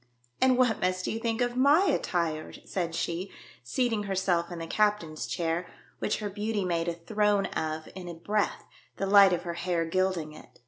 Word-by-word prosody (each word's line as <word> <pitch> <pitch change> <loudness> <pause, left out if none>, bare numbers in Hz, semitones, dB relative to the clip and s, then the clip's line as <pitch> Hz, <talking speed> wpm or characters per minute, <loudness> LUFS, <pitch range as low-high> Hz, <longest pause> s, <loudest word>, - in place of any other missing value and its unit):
" 120 0 -37
And 260 -1 +5
what 245 -4 +2
must 185 0 0
you 225 - -2
think 230 0 -1
of 245 0 0
my 285 +7 +5
attire 165 - -1
?" - - -27
said 170 -3 -2
she, 175 +4 -2 0.3
seating 220 - 0
herself 185 -3 0
in 175 - -5
the 165 - -5
captain's 165 - 0
chair, 165 +7 -1 0.3
which - - 0
her 210 -1 -4
beauty 210 0 -2
made 170 -1 0
a 170 - 0
throne 205 +4 +1
of 155 -3 -3
in 180 -1 -8
a 170 - -6
breath, 205 +5 -1 0.3
the 195 - -1
light 200 -1 +7
of 175 -1 0
her 170 -1 -3
hair 170 -1 -1
gilding 175 -3 0
it. - - -15
185 Hz, 195 wpm, -28 LUFS, 165-210 Hz, 0.3 s, light